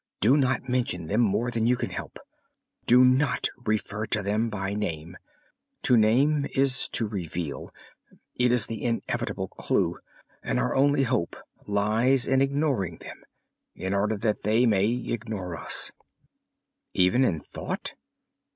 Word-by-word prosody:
"Do 120 +7 +4
not 130 -3 +1
mention 120 -9 -1
them 105 +8 +1
more 115 +2 +1
than 115 -1 0
you 125 - +4
can - - -4
help. - - -7 0.7
Do 125 +2 +7
not 130 +1 +2
refer 110 -3 -3
to 105 - +1
them 105 +3 0
by 100 -2 -3
name. 85 -5 -4 0.7
To 125 - +4
name 135 +7 +3
is 135 -1 +3
to 115 - 0
reveal; 85 -6 -5 0.6
it 125 0 +2
is 120 -4 +3
the 115 -2 -6
inevitable 115 -1 -2
clue, - - -1 0.4
and - - -2
our - - 0
only 140 +1 +3
hope 120 -9 -1 0.3
lies 110 +6 +2
in 135 0 +3
ignoring 135 - 0
them, - - -11 0.5
in 95 +1 -3
order 105 +2 0
that 105 0 -1
they 110 +4 +2
may 105 -3 +3
ignore 110 -6 -3
us." - - +1 1.0
"Even 95 +8 +3
in 85 -11 +1
thought?" - - -5
115 Hz, 140 wpm, -26 LUFS, 100-125 Hz, 1.0 s, Do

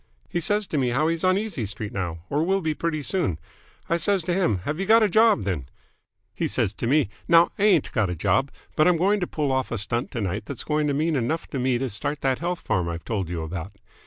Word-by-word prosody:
"He 175 - -2
says 205 +5 +1
to 155 -5 -2
me 130 -2 +1
how 150 +6 +1
he's 165 +1 -1
on 185 0 +4
Easy 195 - -3
Street 105 +1 -5
now, 85 -4 -3
or 145 +6 0
will 195 +3 +1
be 160 -2 0
pretty 155 -1 -2
soon. 165 - 0 0.5
I 170 - +1
says 195 +1 +1
to 175 - -1
him 115 - +1
'Have 150 - -3
you 195 - -2
got 225 +1 +6
a - - +5
job, 215 - +4
then?' 85 -10 -3 0.6
He - - -1
says 95 - 0
to 115 - -3
me 145 0 +3 0.2
'Now, 170 0 +6
I 205 - +3
ain't 185 -8 +3
got 110 -6 +1
a 90 - -2
job, 135 - +1 0.3
but 155 - +4
I'm 180 -2 +4
going 200 +5 +2
to 180 - -2
pull 150 -3 -1
off 130 0 0
a 115 - -2
stunt 115 +4 -1
to 120 - -2
night 100 +2 -2
that's 135 -1 -6
going 150 -1 0
to 140 - 0
mean 155 +2 +1
enough 140 +6 -1
to 135 - -2
me 125 -1 +1
to 135 +2 -2
start 145 +7 -4
that 130 -1 +1
health 175 +1 -2
farm 90 -2 0
I've 85 0 -6
told 100 -7 -2
you 85 -2 -3
about.' 85 +4 -6
145 Hz, 260 wpm, -25 LUFS, 105-170 Hz, 0.6 s, got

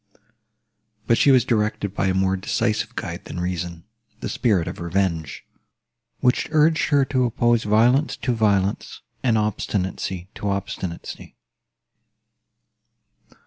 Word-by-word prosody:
But 115 - +3
she - - +5
was 130 -3 +5
directed 105 -4 0
by 95 - 0
a 95 - +1
more 95 0 +2
decisive 105 +3 -1
guide - - -5
than 90 - -6
reason—the 90 +6 -6
spirit 100 -9 +1
of - - -6
revenge, 85 -3 -2 0.8
which 125 - +2
urged 155 +1 +3
her 140 -3 +4
to 130 -2 +1
oppose 120 -1 +1
violence 120 +8 +3
to 125 - -1
violence, 100 -3 0 0.2
and 120 -4 +2
obstinacy 95 -3 -2
to 105 - -3
obstinacy. 95 -3 -5
105 Hz, 115 wpm, -23 LUFS, 95-120 Hz, 0.8 s, she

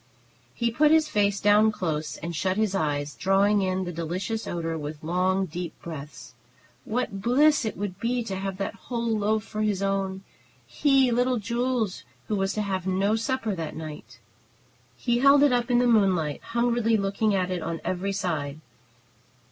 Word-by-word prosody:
He 235 -1 0
put 295 +6 +4
his 315 0 +4
face 200 -3 +1
down 210 +1 +5
close, 155 -7 -3
and 170 +1 -5
shut 185 +4 0
his 215 -3 +1
eyes, 145 -5 -1
drawing 200 +2 +2
in 185 0 0
the 175 - -4
delicious 180 +7 -3
odor 165 -1 -3
with 150 -1 -6
long, 185 +3 +1
deep 175 0 -6
breaths. 150 -5 -9 0.5
What 215 -4 -2
bliss 280 +5 +4
it 220 - -3
would 200 -2 -4
be 240 +1 0
to 195 -4 -4
have 195 0 -4
that 195 - -3
whole 230 +3 -3
loaf 215 +1 0
for 215 -1 -5
his 205 -2 0
own, 195 -1 -1 0.4
he, 270 -3 +3
little 245 +1 +2
Jules, 235 -1 -1 0.3
who 215 - +1
was 195 -1 0
to 215 - -1
have 190 -2 -3
no 195 +3 +2
supper 225 -1 -1
that 165 -4 -5
night! 150 -7 -8 0.8
He 240 - 0
held 275 +2 +6
it 285 -3 +4
up 240 0 0
in 245 - +3
the 245 - +3
moonlight, 190 -10 +2
hungrily 235 -1 +1
looking 200 +1 0
at 185 -1 0
it 180 -2 -2
on 165 0 -3
every 185 +2 -1
side. 155 -7 -3
195 Hz, 175 wpm, -26 LUFS, 180-230 Hz, 0.8 s, held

